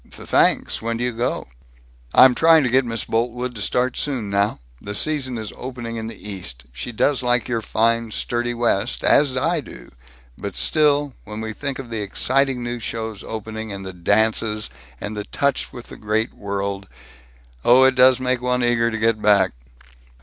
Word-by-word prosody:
"Th - - -12
thanks. - - +2
When 115 0 -2
do 120 - -2
you 125 - 0
go?" 120 +1 -2 0.7
"I'm 130 -1 +8
trying 160 +2 +5
to 125 - 0
get 130 +1 +4
Miss 115 -2 -3
Boltwood 125 +2 -1
to 110 - -7
start 125 +4 0
soon 125 -8 -3
now. 100 -2 +1 0.2
The 100 0 -6
season 135 -2 -1
is 110 -2 -6
opening 120 -3 -6
in 110 0 -4
the 115 - -7
East. 90 -12 -8
She 120 - -5
does 135 +4 +1
like 120 -1 +1
your 115 -2 -1
fine 115 +2 +1
sturdy 120 +2 -2
West, 120 0 0
as 140 -3 +4
I - - +1
do, - - -12 0.5
but 100 -2 -5
still, 145 -2 +2
when 105 0 -7
we 110 -1 -4
think 140 +3 -4
of 125 -3 -8
the 110 -2 -2
exciting 130 +5 +1
new 120 0 -3
shows 110 -2 -5
opening, 110 0 -6
and 100 -1 -6
the 95 - -6
dances, 105 +3 0 0.3
and 105 +1 -5
the 105 0 -4
touch 140 +5 -1
with 120 -2 -10
the - - -10
great 110 +2 -1
world 100 0 -4 0.8
Oh, 125 +2 +6
it 130 0 +5
does 130 0 +6
make 125 -1 0
one 125 0 0
eager 115 -1 +2
to 110 - -3
get 110 0 +1
back." 100 -2 +4
115 Hz, 185 wpm, -22 LUFS, 105-125 Hz, 0.8 s, I'm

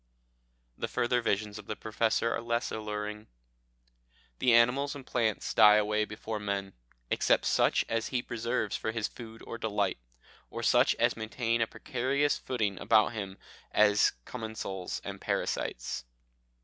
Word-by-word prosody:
The - - -1
further 120 0 +1
visions 105 -1 -1
of 105 - -12
the 110 - -3
Professor 115 +1 0
are - - -2
less 115 0 -1
alluring. 105 0 -4 1.1
"The 125 - +4
animals 125 +5 +4
and 135 -2 -9
plants 110 -6 -1
die 105 -1 +8
away 105 0 +2
before 105 +1 -5
men, 100 -1 -3 0.4
except - - +3
such - - +3
as 115 0 -1
he 125 -2 -1
preserves 115 -2 -2
for 110 - -2
his 115 -1 -1
food 115 -2 -11
or 115 - -6
delight, 100 - -1 0.5
or - - -6
such - - +4
as - - +2
maintain 115 +1 -1
a 115 - +2
precarious 135 +6 0
footing 105 -7 -2
about 110 +2 +4
him 100 -3 -5 0.3
as 105 -1 +4
commensals 110 -6 -5
and - - -7
parasites. - - -2
110 Hz, 145 wpm, -30 LUFS, 105-120 Hz, 1.1 s, die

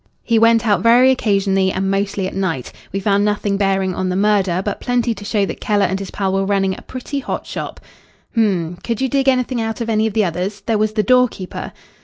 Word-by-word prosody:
He 230 -1 +2
went 230 +1 +4
out 205 -5 +2
very 240 +4 +6
occasionally, 195 -5 +1
and 190 +1 -1
mostly 195 0 -1
at 185 - -4
night. 185 -9 -2 0.2
We 195 - -2
found 200 0 +2
nothing 205 -1 0
bearing 195 -1 +1
on 185 +1 -2
the 180 - -1
murder, 195 -3 +2
but 205 - -3
plenty 245 -1 0
to 205 - -10
show 205 -1 0
that - - -7
Keller 205 -1 +2
and 190 - -1
his 195 - -6
pal 195 -2 -2
were 195 0 +1
running 195 -1 +1
a - - -11
pretty 260 +2 -5
hot - - -4
shop." - - -6 0.5
"H'm! 180 -7 0
could 230 -2 -2
you 265 - +1
dig 270 +1 0
anything 255 -2 0
out 225 +1 -3
of 230 -1 -2
any 220 0 +2
of 220 - -4
the 215 -1 +2
others? 185 +4 -3
There 220 +1 0
was 215 0 +1
the 215 -1 +1
door 250 +4 +5
keeper." 185 -5 -7
205 Hz, 235 wpm, -19 LUFS, 195-230 Hz, 0.5 s, very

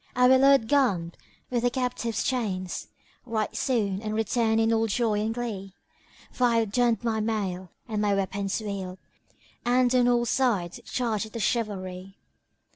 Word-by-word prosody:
I 250 0 +5
will 260 +1 +6
load 275 -4 +5
Gharib 200 -12 +2 0.4
with 240 -1 +1
the 245 - +2
captive's 245 -2 -2
chains 195 -8 -2 0.2
* - - -33
Right 220 -2 -2
soon, 210 -7 0
and 215 -1 -3
return 225 0 +1
in 225 0 +3
all 225 0 +2
joy 220 0 +1
and 220 +1 -1
glee; 210 -5 -5 0.6
For 250 - +1
I've 230 -3 +2
donned 240 0 +2
my 225 -2 0
mail 195 -5 -2 0.2
and 215 -2 -2
my 205 -1 +2
weapons 195 +1 -1
wield 195 -3 -5 0.3
* - - -33
And 245 +1 +3
on 250 -1 +4
all 240 -1 +3
sides 215 -10 0
charge 225 -4 -1
at 215 - -17
the 230 - -4
chivalry." 195 -5 -2
225 Hz, 170 wpm, -27 LUFS, 200-240 Hz, 0.6 s, will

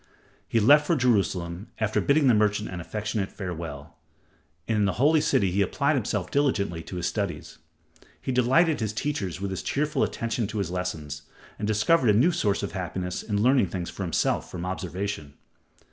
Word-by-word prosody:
He 115 - +2
left 145 +7 +6
for 170 - +3
Jerusalem, 100 - 0
after 110 -1 +1
bidding 145 +1 +3
the 125 - +6
merchant 105 0 +1
an 90 -2 -5
affectionate 105 +2 -3
farewell, 85 -6 -7 0.7
and 110 - +1
in 105 - +3
the 100 - +1
Holy 150 +6 +3
City 100 -10 +2
he 100 +3 +1
applied 100 - +1
himself - - -2
diligently 100 - +1
to 90 - -8
his 90 -1 -3
studies. 100 -3 -3 0.6
He - - -3
delighted 135 +6 +3
his 110 -2 -2
teachers 105 - -3
with 100 0 -3
his 95 - -3
cheerful 150 +2 -1
attention 115 -1 -1
to 110 - -5
his 95 -4 -2
lessons, 80 -5 -4 0.4
and 105 - -2
discovered 110 +6 +3
a - - +6
new 150 +10 +5
source 100 - 0
of 100 - -3
happiness 90 0 -4
in 105 -1 -1
learning 130 -4 +4
things 85 0 -5
for - - -8
himself 90 -3 0
from 90 -1 -5
observation. 90 -4 -4
100 Hz, 180 wpm, -26 LUFS, 90-120 Hz, 0.7 s, left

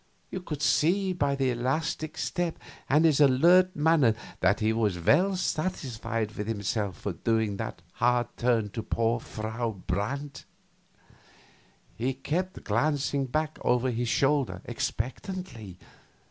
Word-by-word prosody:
You 185 - -3
could 150 -5 -5
see 185 +8 +3
by 145 -5 0
his 130 -3 0
elastic 150 +4 -2
step 175 -2 -2 0.3
and 150 +4 +5
his 150 -2 +4
alert 175 +7 +5
manner 150 -7 +4 0.2
that 95 +3 +3
he 110 +1 +2
was 105 -5 +1
well 180 - +3
satisfied 130 - -2
with 105 -1 -5
himself 105 -2 -2
for 100 - -4
doing 110 +1 0
that 110 -5 -5
hard 120 0 +2
turn 115 -3 +1
for 110 - -4
poor 115 +1 0
Frau 110 -1 -4
Brandt. 135 +9 -3 1.5
He 125 +3 -1
kept 175 +7 -3
glancing 140 +4 0
back 155 +4 -2
over 125 +1 +2
his 120 0 -1
shoulder 135 -11 +1
expectantly. 120 - -4
125 Hz, 130 wpm, -28 LUFS, 110-155 Hz, 1.5 s, and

